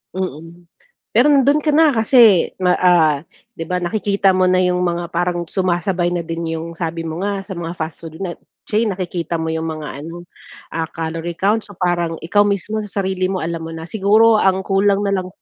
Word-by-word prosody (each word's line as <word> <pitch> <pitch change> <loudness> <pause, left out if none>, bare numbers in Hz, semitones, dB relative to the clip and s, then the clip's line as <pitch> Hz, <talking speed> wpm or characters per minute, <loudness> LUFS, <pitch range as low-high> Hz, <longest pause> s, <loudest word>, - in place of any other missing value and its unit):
Mm. 170 -2 -6 0.5
Pero 245 +5 +4
nandun 280 +2 +4
ka 300 - +2
na, 315 +1 +5
kasi 225 - +4
ma 180 -1 +3
ah, 170 -5 +4 0.4
'di 165 - -4
ba 180 +2 -2
nakikita 200 +2 +1
mo 185 - +3
na 185 0 +3
yung 180 0 +1
mga 170 -1 -2
parang 175 0 -2
sumasabay 180 -1 0
na 175 - -1
din 165 0 -5
yung 165 +1 -7
sabi 165 0 -3
mo 165 0 -5
nga, 200 -1 -2
sa 190 -1 -8
mga 170 0 -4
fast 160 -1 -6
food 160 +2 -9
na, 180 -3 -4 0.3
chain, 220 +2 +1
nakikita 175 -2 -3
mo 160 - -3
yung 160 0 -2
mga 155 -3 -6
ano, 170 +2 -9 0.4
ah, 165 0 -2
calorie 165 +1 -4
count. 210 +3 +2
So, 205 - -11
parang 175 -2 0
ikaw 205 +5 +2
mismo, 205 +2 -2
sa 205 -1 -4
sarili 190 -1 -1
mo, 190 - -2
alam 165 0 -4
mo 165 - -6
na. 165 0 -7
Siguro 220 +3 +4
ang 190 -2 +2
kulang 195 +1 +2
na 200 - +1
lang 185 -1 -3
180 Hz, 200 wpm, -19 LUFS, 165-200 Hz, 0.5 s, na